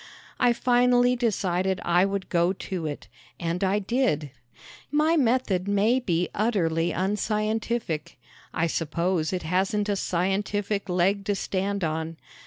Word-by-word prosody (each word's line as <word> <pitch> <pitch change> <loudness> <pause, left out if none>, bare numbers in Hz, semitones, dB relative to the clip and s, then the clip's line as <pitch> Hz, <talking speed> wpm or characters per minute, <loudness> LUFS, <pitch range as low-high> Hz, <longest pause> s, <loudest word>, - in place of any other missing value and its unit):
I 245 -1 +4
finally 245 +1 +3
decided 190 -5 0
I 175 +2 +4
would 195 -1 -3
go 175 +1 +2
to 180 -4 -4
it. 145 - -6 0.3
And 170 +2 -2
I 195 +1 +2
did. 205 - 0 0.6
My 305 +3 +3
method 230 - +1
may 205 +5 +3
be 175 -7 0
utterly 175 -7 +1
unscientific. 215 -2 -1 0.3
I 170 - 0
suppose 165 +1 -1
it 185 -2 -3
hasn't 195 +5 0
a 205 - +1
scientific 200 +2 -1
leg 185 +3 +1
to 205 -2 0
stand 195 0 -2
on. 160 0 -2
195 Hz, 130 wpm, -26 LUFS, 175-215 Hz, 0.6 s, I